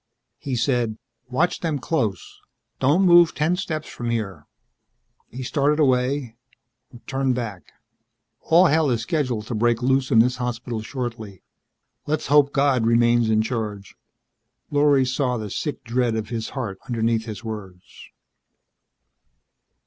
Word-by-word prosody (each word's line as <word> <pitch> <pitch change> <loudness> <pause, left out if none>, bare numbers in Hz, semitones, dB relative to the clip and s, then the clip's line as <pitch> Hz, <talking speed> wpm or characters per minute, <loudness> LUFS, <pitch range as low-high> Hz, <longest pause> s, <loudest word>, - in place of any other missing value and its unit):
He 135 -2 -3
said, 120 -3 0 0.3
"Watch 160 +8 0
them 160 -4 -1
close. 115 - -3 0.4
Don't 145 +9 +3
move 175 -2 +6
ten 155 +4 +1
steps 160 -5 -4
from 120 -1 -5
here." 100 -10 -3 0.8
He 130 +3 -7
started 145 +3 +1
away 130 -3 +1 0.7
turned 135 -2 0
back. 110 -7 -6 0.8
"All 170 +3 +6
hell 160 -3 +3
is 120 -2 0
scheduled 125 -9 -1
to 120 - -5
break 120 +2 +1
loose 130 0 +2
in - - +3
this 125 +3 +4
hospital 120 -2 -4
shortly. 115 -5 -6 0.6
Let's 155 +1 -1
hope 145 -1 +5
God 140 -4 +2
remains 120 0 +3
in 110 0 +3
charge." 105 -4 -4 0.8
Lorry 145 -2 +4
saw 125 -1 -1
the 105 -3 -6
sick 150 - -4
dread 120 -1 0
of 110 -1 -4
his 115 -2 -4
heart 100 -7 -4
underneath 115 -1 0
his 110 0 -7
words. 100 -5 -9
125 Hz, 135 wpm, -23 LUFS, 110-140 Hz, 0.8 s, move